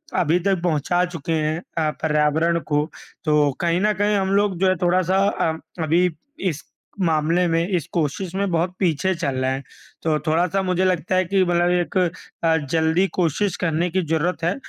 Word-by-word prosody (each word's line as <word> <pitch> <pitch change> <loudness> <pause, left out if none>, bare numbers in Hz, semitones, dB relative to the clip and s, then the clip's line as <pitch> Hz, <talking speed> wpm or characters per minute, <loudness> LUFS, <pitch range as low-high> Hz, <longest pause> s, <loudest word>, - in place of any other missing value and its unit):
अभी 170 +1 +2
तक 190 -1 0
पहुँचा 175 +2 +1
चुके 165 -3 -4
हैं 155 +1 0 0.2
अ, 155 -1 +2
पर्यावरण 160 +2 +2
को, 150 0 +1 0.4
तो 150 -2 +3
कहीं 170 +1 +1
न 210 0 +3
कहीं 205 +1 +1
हम 190 -1 0
लोग 200 -2 +1
जो 190 - +3
है 185 - +2
थोड़ा-सा 185 +1 +2
अ, 160 -5 0 0.3
अभी 170 +3 +3 0.4
इस 155 -1 -6 0.4
मामले 165 +1 +2
में, 165 +1 +1
इस 180 -6 -1
कोशिश 170 +3 -2
में, 200 0 0
बहुत 170 +2 0
पीछे 185 +1 +1
चल 140 -5 -2
रहे 130 0 0
हैं। 135 +1 -3 0.4
तो 155 -2 +2
थोड़ा-सा 175 +4 +1
मुझे 185 0 +1
लगता 180 0 0
है 185 0 +2
कि 190 +2 +2
मतलब 175 0 +2
एक 180 +1 0 0.5
अ, 165 -1 +4 0.2
जल्दी 160 +3 +2
कोशिश 175 +3 +1
करने 170 +1 0
की 190 - +1
ज़रूरत 165 +2 -1
है। 175 +3 +1
170 Hz, 185 wpm, -22 LUFS, 160-185 Hz, 0.5 s, अ